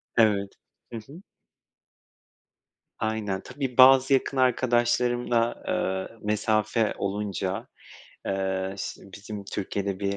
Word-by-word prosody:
Evet. 100 -3 +3 0.4
Hı - - -3
hı. 140 - -13 1.8
Aynen. 110 -3 -2
Tabii 130 -1 -5
bazı 130 +1 +7
yakın 135 0 +1
arkadaşlarımla, 120 -1 +2
eee, 95 +4 -2
mesafe 110 +1 +1
olunca, 100 +2 -3 0.6
eee, 95 0 -1
ş - - -5 0.2
bizim 105 0 -8
Türkiye'de 100 -1 -3
bir 100 0 -1
110 Hz, 95 wpm, -26 LUFS, 100-120 Hz, 1.8 s, bazı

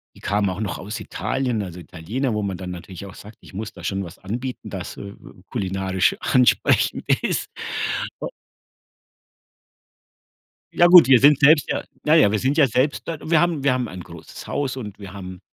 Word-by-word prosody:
Die - - -17
kamen 100 0 0
auch 95 +3 -4
noch 100 -5 -3
aus 105 +4 -6
Italien. 125 -5 -2
Also 90 -2 -8
Italiener, 105 +10 -4
wo 105 - -1
man 95 -2 -3
dann 90 -1 -7
natürlich 90 +2 -9
auch 95 - -12
sagt, 105 +1 -13
ich - - -16
muss 105 +3 -6
da - - -13
schon 95 0 -2
was 90 +1 -11
anbieten, 125 +6 -5
das, - - -7
äh, - - -7
äh, 100 - -12 0.3
kulinarisch 95 -3 0
ansprechend 125 -1 +2 0.2
ist. - - -1 0.7
U - - -2 2.5
Ja 175 - +6
gut, 175 -6 +9
wir 130 -2 +7
sind 145 +2 +6
selbst, 150 +1 +5
ja - - -1 0.2
ja 155 +1 +4
ja, 140 -11 +5
wir 110 - 0
sind 135 +6 0
ja 150 - +6
selbst 130 +5 0
dort 165 -3 -5
und - - -8
wir 165 -2 +5
haben 170 -4 0
wir 135 -2 +3
haben 125 -1 -1
ein 90 -3 -8
großes 85 -2 -11
Haus 140 -2 -2
und 105 -6 -7
wir 100 -3 -10
haben 95 -2 -8
105 Hz, 195 wpm, -22 LUFS, 95-135 Hz, 2.5 s, gut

